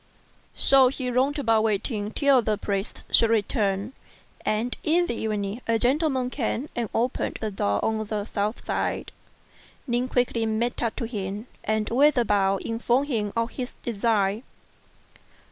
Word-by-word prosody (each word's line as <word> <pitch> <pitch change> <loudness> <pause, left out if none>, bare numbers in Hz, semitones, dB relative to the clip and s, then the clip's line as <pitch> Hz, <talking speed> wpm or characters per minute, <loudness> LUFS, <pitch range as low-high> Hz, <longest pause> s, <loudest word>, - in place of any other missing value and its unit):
So 270 -1 +6
he 255 -1 -2
roamed 265 +4 +1
about 225 -6 +3
waiting 210 0 0
till 275 +2 +3
the 215 -2 0
priests 200 0 -3
should 230 - +5
return; 210 0 0 0.5
and 225 +4 0
in 345 +3 +3
the 345 - -2
evening, 215 0 -3
a 230 0 +3
gentleman 260 0 +1
came 260 +2 -2
and 235 -3 -2
opened 240 +2 -1
the 215 -1 -3
door 100 - 0
on 220 0 0
the 210 -1 -2
south 210 +1 -3
side. - - -2 0.7
Ning 245 -1 0
quickly 245 -3 0
made 230 +2 -1
up 230 -2 -1
to - - -3
him, 205 -1 -4 0.2
and 215 0 0
with 280 +4 +4
a 240 - +3
bow 195 -2 +2
informed 240 +5 0
him 210 -6 -1
of 230 0 0
his 250 -2 -6
design. 215 -2 +1
230 Hz, 155 wpm, -25 LUFS, 210-250 Hz, 0.7 s, So